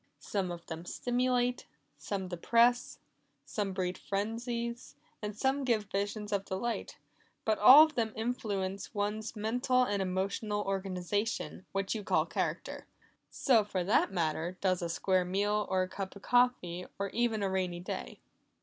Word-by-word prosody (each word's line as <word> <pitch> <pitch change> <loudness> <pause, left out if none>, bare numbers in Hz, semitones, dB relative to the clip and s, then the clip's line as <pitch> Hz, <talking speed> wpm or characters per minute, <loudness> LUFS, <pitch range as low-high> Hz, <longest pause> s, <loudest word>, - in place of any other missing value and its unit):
Some 195 -3 -2
of 170 -1 -7
them 165 0 -6
stimulate, 245 +4 0 0.3
some 185 +6 -4
depress, 235 +7 +2 0.5
some 205 -2 -2
breed 185 -1 -2
frenzies, 235 +4 -3 0.3
and 210 -1 -5
some 270 +3 +1
give 230 -5 +2
visions 205 +1 -2
of 200 -1 +1
delight 210 +5 -3 0.5
but 220 -1 +1
all 260 +8 +11
of 315 -1 0
them 225 -5 0
influence 205 -4 -3
one's 210 +2 -2
mental 245 +4 +2
and 205 -5 0
emotional 200 +3 -1
organization, 195 +1 -2
which 195 0 -1
you 215 -2 -4
call - - +2
character. - - -3 0.4
So 235 -6 +3
for 190 -3 -2
that 195 +2 +3
matter, 170 0 -1
does 185 -2 +1
a 170 - -2
square 185 +2 +1
meal, 205 +3 0
or 185 -1 +2
a - - -3
cup 190 +1 -6
of 200 - -12
coffee, 245 -8 +2
or 200 0 -2
even 230 -3 0
a 195 - +1
rainy 180 -2 -1
day." 65 - -5
205 Hz, 150 wpm, -32 LUFS, 185-235 Hz, 0.5 s, all